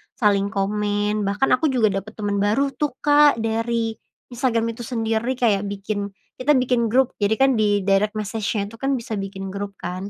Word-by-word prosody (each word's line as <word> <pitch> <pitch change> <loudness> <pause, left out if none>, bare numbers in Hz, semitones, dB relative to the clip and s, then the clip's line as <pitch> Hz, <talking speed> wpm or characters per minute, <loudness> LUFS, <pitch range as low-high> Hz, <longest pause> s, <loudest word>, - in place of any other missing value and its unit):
saling 200 -3 +2
komen, 205 0 -1
bahkan 205 +7 +1
aku 305 +5 +3
juga 235 -6 +2
dapat 215 +3 -13
teman 205 -2 -2
baru 230 +8 +1
tuh, 295 -3 -2
Kak, 290 -1 +6
dari 225 0 -1 0.4
Instagram 230 -2 0
itu 230 0 -8
sendiri. 225 +1 -1
Kayak 210 -5 +1
bikin 200 0 -3 0.3
kita 290 +3 +3
bikin 250 -2 +2
grup, 255 +3 +2
jadi 205 +2 +2
kan 265 -3 +3
di 205 -2 +2
direct 200 +2 +2
message-nya 210 0 -2
itu 230 - -13
kan 275 0 0
bisa 225 -4 -4
bikin 195 -1 -6
grup 200 0 -5
kan, 185 +3 -5
220 Hz, 180 wpm, -22 LUFS, 200-240 Hz, 0.4 s, Kak